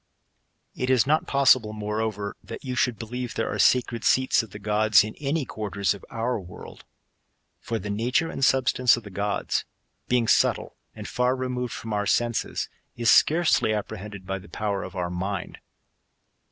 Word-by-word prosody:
It 125 - -3
is 130 -2 +4
not 155 +3 +1
possible, 130 -5 +4
moreqver, 105 -1 -3
that - - -8
you 130 - -3
should 125 -2 +1
believe 120 +1 -5
there - - -1
^re - - +1
sacred 120 -2 +2
seats 130 0 +3
of 115 - -10
the 100 - -9
gods 105 -1 +4
in 110 +1 -6
any 145 0 -1
quarters 100 -3 -2
of 100 - -12
our 115 +1 -2
world. 90 -2 -12 0.7
For 115 - -3
the 105 0 -5
nature 125 +10 +1
and 135 - -4
substance 130 -2 +4
of 120 - -8
the 100 - -10
gods, 100 +2 -1 0.4
being 125 -2 +2
subtle - - +2 0.2
and - - -7
fair 125 +1 +1
removeld 125 -1 -3
from 110 -1 -6
our 105 0 -1
senses, 120 -1 0 0.3
is 120 -1 +3
scarcely 160 -9 +4
apprehended 105 -2 -6
by 95 +1 -3
the 100 - -15
power 100 -2 -2
of 95 - -8
our 90 -1 -2
mind. 95 +1 -4
110 Hz, 170 wpm, -25 LUFS, 105-125 Hz, 0.7 s, is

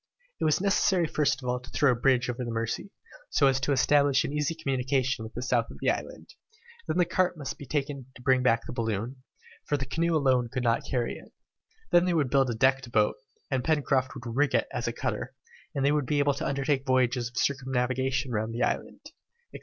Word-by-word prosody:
It - - 0
was 155 - +3
necessary 190 -2 +2
first 140 -4 0
of - - -5
all 125 0 0
to 125 +1 -14
throw 140 +2 +3
a - - +1
bridge 125 +1 +2
over 125 +1 -3
the 120 - -4
Mercy, 115 - -3 0.4
so 140 - +3
as 135 -1 +3
to 140 +2 -1
establish 140 0 +3
an 140 - -4
easy 150 +2 -1
communication 130 -4 -1
with 110 - -9
the 120 - -4
south 120 -3 +1
of - - -10
the - - +2
island; - - -6 0.6
then - - -1
the 180 - +4
cart 180 0 0
must 145 -3 -6
be 140 - -9
taken 140 -2 -3
to - - -13
bring 130 0 +3
back 115 -2 +2
the - - -6
balloon, 115 +1 -2 0.5
for 145 - +1
the 135 - -3
canoe 170 +2 0
alone 130 -5 +2
could 125 - -2
not 115 -1 +1
carry 120 -3 -1
it, - - -17 0.6
then 175 +1 +5
they 180 -2 +1
would 145 -6 +1
build 135 -2 +3
a 120 - -2
decked 130 +1 +2
boat, 105 -2 +2 0.4
and 130 -2 0
Pencroft 140 -4 +1
would 125 -2 -9
rig 145 +1 +2
it - - +2
as - - -2
a - - 0
cutter, - - -4 0.4
and 135 -1 0
they 140 - +4
would 150 -3 0
be 150 - +1
able 145 0 +3
to 140 - -3
undertake 140 0 0
voyages 125 -2 +1
of 125 - -14
circumnavigation 130 0 0
round 110 0 -2
the 120 - 0
island, - - -2 0.5
etc. - - -8
130 Hz, 225 wpm, -28 LUFS, 125-145 Hz, 0.6 s, then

